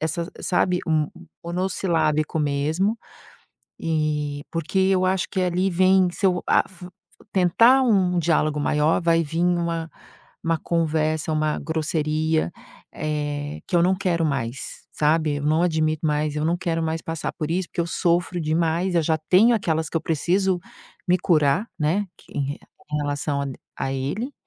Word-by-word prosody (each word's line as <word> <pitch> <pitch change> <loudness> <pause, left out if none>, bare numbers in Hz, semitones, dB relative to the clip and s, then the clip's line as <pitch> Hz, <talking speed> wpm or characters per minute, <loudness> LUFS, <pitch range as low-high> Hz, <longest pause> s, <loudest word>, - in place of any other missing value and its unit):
Essa 165 +3 -2
sabe, 180 0 +1
m 155 -2 +1 0.4
monossilábico 170 -4 0
mesmo. 155 +9 0 0.8
Eh, 150 -2 -1
porque 165 +3 -2
eu 190 -1 +3
acho 185 -1 +1
que 190 - -1
ali 180 +1 +1
vem, 185 0 +4
se 195 - 0
eu 180 -1 +1
a - - +5
f 180 -1 -11 0.5
tentar 230 +8 +5
um 190 -7 +2
diálogo 155 -3 +1
maior, 150 +3 +2
vai 165 0 +3
vim 165 +4 0
uma 170 -2 0 0.6
uma 165 -1 +1
conversa, 155 -1 0
uma 155 0 0
grosseria, 155 0 0 0.4
eh, 145 -1 -3
que 175 - 0
eu - - +5
não 185 +2 +3
quero 175 -4 0
mais, 135 -3 -4
sabe. 155 -1 +1
Eu 145 - -4
não 155 +3 +2
admito 155 -2 0
mais, 150 0 0
eu 150 - -1
não 170 +2 +1
quero 165 -2 -2
mais 160 0 -1
passar 165 -1 -3
por 155 - -4
isso, 180 +1 -1
porque - - -3
eu 170 - 0
sofro 175 +1 0
demais. 165 +3 0
Eu 165 - +3
já 160 0 +1
tenho 225 +6 +6
aquelas 160 -7 0
que 165 - -4
eu - - +1
preciso 180 +4 +1 0.5
me 180 - +5
curar, 170 +4 +2
né, 170 +7 +1
que - - -19
em 140 - +1
re 140 +1 -4 0.3
em - - +1
relação 145 0 -2
a - - -2 0.3
a 135 - -2
ele. 150 - -3
165 Hz, 165 wpm, -23 LUFS, 155-180 Hz, 0.8 s, tenho